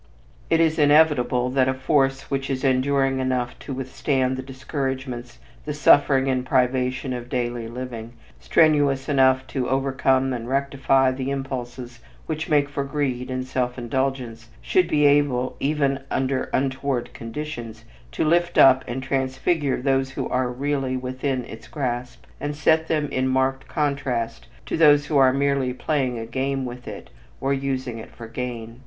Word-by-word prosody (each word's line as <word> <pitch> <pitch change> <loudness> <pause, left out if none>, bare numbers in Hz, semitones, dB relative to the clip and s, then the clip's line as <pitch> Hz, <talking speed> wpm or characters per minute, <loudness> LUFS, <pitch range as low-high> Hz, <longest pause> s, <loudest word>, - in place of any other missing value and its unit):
It 165 - +3
is 160 -1 +2
inevitable 145 -5 +4
that 130 -1 +2
a 130 - 0
force 135 0 0
which 135 0 -2
is 135 0 -2
enduring 135 0 +2
enough 130 -2 -1
to - - -8
withstand 130 0 -1
the 130 - -4
discouragements, 130 -2 -5 0.3
the 150 -1 -4
suffering 140 -2 +4
and 130 -1 0
privation 130 0 0
of 120 0 -6
daily 120 -2 -2
living, 120 -1 -7 0.3
strenuous 145 -4 +3
enough 130 -2 +3
to 130 -2 -1
overcome 135 0 +1
and 120 -1 -5
rectify 135 -1 +2
the 130 +1 -4
impulses 125 -3 -5 0.3
which 160 0 -4
make 145 -2 +3
for 140 -1 -3
greed 135 -3 -2
and 130 0 -3
self 125 -1 -2
indulgence, 120 -2 -3
should 180 -2 +2
be 150 -3 +2
able, 140 -3 +2
even 140 -1 +1
under 130 0 -1
untoward 130 -1 -1
conditions, 115 -2 -7 0.3
to - - -1
lift 175 +2 +2
up 130 -1 +7
and 130 +2 -4
transfigure 135 +3 0
those 135 -1 +1
who 135 - -4
are 125 0 0
really 135 0 -1
within 130 0 -3
its 115 -1 -11
grasp 125 -3 -4
and 145 +1 -3
set 160 +2 +2
them 150 -2 0
in 130 0 0
marked 130 0 0
contrast 130 - -2 0.2
to - - -2
those 145 -2 +6
who 150 - 0
are 130 -1 +6
merely 140 -1 +1
playing 130 -4 -1
a 115 - -5
game 135 +3 -2
with 125 0 -8
it - - -8 0.3
or 135 +1 0
using 130 -3 -3
it 110 - -10
for 115 - -11
gain. 115 -1 -6
130 Hz, 160 wpm, -23 LUFS, 125-140 Hz, 0.3 s, up